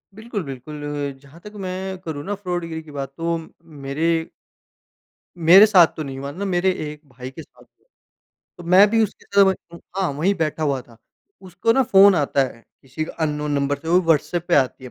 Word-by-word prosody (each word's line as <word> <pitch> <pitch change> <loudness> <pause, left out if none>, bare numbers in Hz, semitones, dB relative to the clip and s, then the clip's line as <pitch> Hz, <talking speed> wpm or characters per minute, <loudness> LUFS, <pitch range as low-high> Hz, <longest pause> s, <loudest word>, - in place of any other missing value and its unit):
बिल्कुल, 220 -2 -5
बिल्कुल 140 +2 -8 0.4
जहाँ 145 +4 -17
तक 210 +2 -12
मैं 190 +1 -4
करूँ 150 -3 -5
ना 205 - -2
फ्रॉड 180 -3 -4
गिरी 160 -1 -6
की 155 - -14
बात 140 -1 -6
तो 170 0 -1 0.5
मेरे 150 +4 -1 1.3
मेरे 175 +5 +8
साथ 185 -6 +6
तो 155 - -3
नहीं 135 -2 -7
हुआ 140 +1 -5
ना, 195 +7 -5
मेरे 190 0 +1
1 150 -4 -6
भाई 125 0 -9
के 150 - -10
साथ - - -19
हुआ, - - -34 0.7
तो - - -9
मैं 185 +4 +6
भी 225 0 +3
उसके 210 - -4
साथ 200 0 +4
वहीं 190 -3 -2
उ - - -15 0.2
हाँ, 190 -4 +1
वही 160 +8 +1
बैठा 160 -3 -2
हुआ 140 -3 0
था। 115 -1 -20 0.5
उसको 185 +5 0
ना 265 - +3
फ़ोन 200 -4 +6
आता 145 -3 +1
है 115 -3 -9 0.2
किसी 135 +4 -5
अन्नोन 150 -2 -3
नंबर 140 0 0
से 160 - -9
वो 175 +2 +4
व्हाट्सएप 165 +1 0
पे 175 - +3
आती 130 -1 +1
है 125 - -9
165 Hz, 205 wpm, -21 LUFS, 145-190 Hz, 1.3 s, मेरे